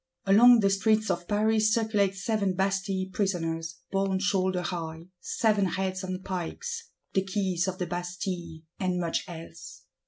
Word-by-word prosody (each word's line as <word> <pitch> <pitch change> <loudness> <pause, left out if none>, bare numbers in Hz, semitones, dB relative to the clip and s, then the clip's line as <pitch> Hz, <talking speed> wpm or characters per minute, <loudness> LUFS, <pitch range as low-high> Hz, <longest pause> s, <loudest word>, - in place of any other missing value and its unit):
Along 230 +4 +7
the 195 -1 +3
streets 215 +2 +2
of 175 0 -3
Paris 215 +1 +3
circulate 215 -4 +2
Seven 200 -1 0
Bastille 190 0 0
Prisoners, 165 -4 -1 0.2
borne 195 -1 +1
shoulder 190 -2 +1
high: 165 -1 -5
seven 210 -4 +1
Heads 190 0 -2
on 185 0 -4
pikes; 460 - -4 0.2
the 190 - +2
Keys 190 -2 -1
of 185 -1 -2
the 180 - -2
Bastille; 175 -2 -4 0.2
and 185 -2 0
much 170 -2 -1
else. 165 -2 -10
190 Hz, 145 wpm, -28 LUFS, 180-205 Hz, 0.2 s, Along